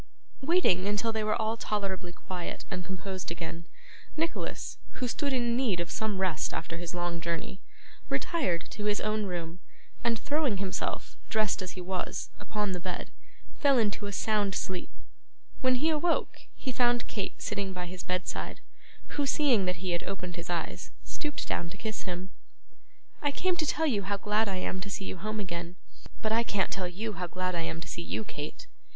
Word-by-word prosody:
Waiting 265 - +5
until 205 +3 +2
they 220 -1 0
were 215 +2 +2
all 220 0 +2
tolerably 195 -5 -1
quiet 180 0 -4
and 180 - -1
composed 190 0 -3
again, 170 0 -4 0.5
Nicholas, 330 +1 -1
who 255 - -1
stood 280 +4 +1
in 240 -2 +3
need 235 -8 +3
of 170 - -1
some 215 -3 0
rest 185 -5 +1
after 165 +1 -2
his 175 0 -4
long 175 -1 0
journey, 170 +3 -2 0.5
retired 185 - +1
to 210 - -3
his 210 0 +3
own 215 -1 +1
room, 175 -1 -3 0.4
and 230 -1 +3
throwing 285 -5 +2
himself, 195 0 -1
dressed 215 -3 +3
as 185 - -3
he 185 - -5
was, 180 0 -2
upon 210 -2 0
the 180 - -1
bed, 180 0 -3 0.5
fell 280 -3 +6
into 210 -2 +2
a - - -2
sound 205 -1 +2
sleep. 185 -1 -1 0.7
When 255 -1 +5
he 310 +6 +4
awoke, 320 +2 +1
he 265 - -2
found 240 0 +4
Kate 205 - -2
sitting 195 -1 -1
by 180 -1 -3
his 180 +1 -5
bedside, 180 0 -1 0.5
who, 290 -1 +1
seeing 265 -9 +5
that 180 0 -1
he 180 - +1
had 175 - +2
opened 180 -3 -3
his 170 0 -5
eyes, 170 -2 -1
stooped 300 -2 -3
down 170 - 0
to 195 - -8
kiss 220 0 -3
him. 180 +2 -3 0.9
'I 290 - +3
came 370 +3 +3
to 315 -3 +1
tell 320 +2 +3
you 230 -10 +3
how 200 +1 0
glad 210 +2 +3
I 190 - 0
am 185 0 -1
to 200 - -3
see 195 0 -2
you - - -3
home 215 +4 -2
again.' 175 -2 -3 0.5
'But 215 - +2
I 225 +1 +5
can't 205 -4 +1
tell 185 -2 0
you 210 +5 -2
how 180 -2 -2
glad 185 +1 0
I 170 - +1
am 165 0 -2
to 165 - -6
see 170 - -3
you, 195 - -1
Kate. 150 -7 -5
195 Hz, 190 wpm, -31 LUFS, 180-225 Hz, 0.9 s, fell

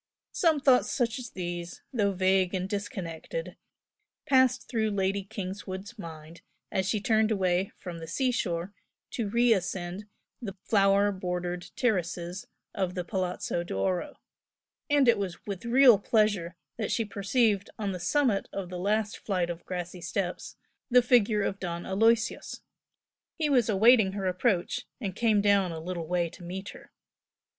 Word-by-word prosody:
Some 320 -4 +2
thoughts 265 -3 +4
such 245 0 0
as 245 - -7
these, 175 -1 -6
though 205 -5 +2
vague 190 0 +2
and 185 0 -2
disconnected, 200 - -5 0.7
passed 260 -2 +3
through 220 -3 0
Lady 195 -1 0
Kingswood's 195 +1 -6
mind 160 -1 -9 0.3
as 190 0 0
she 215 - +1
turned 220 +1 +2
away 190 -2 +1
from 175 -2 -7
the 165 - -8
sea 255 - 0
shore 180 -5 -2 0.4
to 225 -4 -2
re 235 +2 +4
ascend 185 +1 -3 0.3
the 200 -5 -6
flower 200 -1 +3
bordered 180 -2 -4
terraces 180 -5 -1 0.3
of 185 -1 -2
the 180 - -2
Palazzo 180 -2 -2
d'Oro, 175 - -2 0.7
and 290 -2 +4
it 230 -3 +5
was 190 -3 -5
with 200 0 -5
real 245 -3 +7
pleasure 205 -6 +1 0.2
that 220 - -2
she 225 - +1
perceived 205 0 +1
on 205 -2 -2
the 180 - -5
summit 230 +3 +1
of 190 -3 -5
the 180 -1 -5
last 210 +2 0
flight 180 -4 -1
of 170 0 -8
grassy 180 -1 -5
steps, 180 +1 -3 0.3
the 250 0 +6
figure 225 -4 +3
of 195 0 -2
Don 170 -2 -4
Aloysius. 225 +4 +1 0.8
He 305 -2 0
was 245 -5 +3
awaiting 215 -1 +5
her 195 -1 -3
approach, 185 0 0
and 195 -7 -4
came 220 -3 +3
down 200 -3 +3
a 165 - -5
little 170 0 -5
way 175 0 +1
to 165 - -13
meet 190 +3 -6
her. - - -13
195 Hz, 155 wpm, -28 LUFS, 180-225 Hz, 0.8 s, real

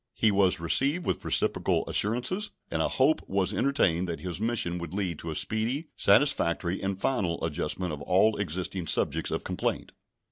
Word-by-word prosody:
He 110 - +3
was 95 -2 +3
received 135 - +2
with - - -2
reciprocal - - +2
assurances, 125 - 0 0.2
and - - 0
a - - +2
hope 140 +4 +2
was 95 -1 +1
entertained 95 - +1
that 85 - -5
his 90 +1 -5
mission 110 -7 -1
would 85 +1 -6
lead 90 -6 -2
to 80 - -6
a 80 - -4
speedy, 120 - -2
satisfactory, 90 - +2
and 95 0 -3
final 90 -10 -1
adjustment 80 +2 -2
of 75 - -7
all 95 +6 +3
existing 95 -1 -3
subjects - - +1
of - - -3
complaint. - - -3
95 Hz, 170 wpm, -27 LUFS, 85-115 Hz, 0.2 s, He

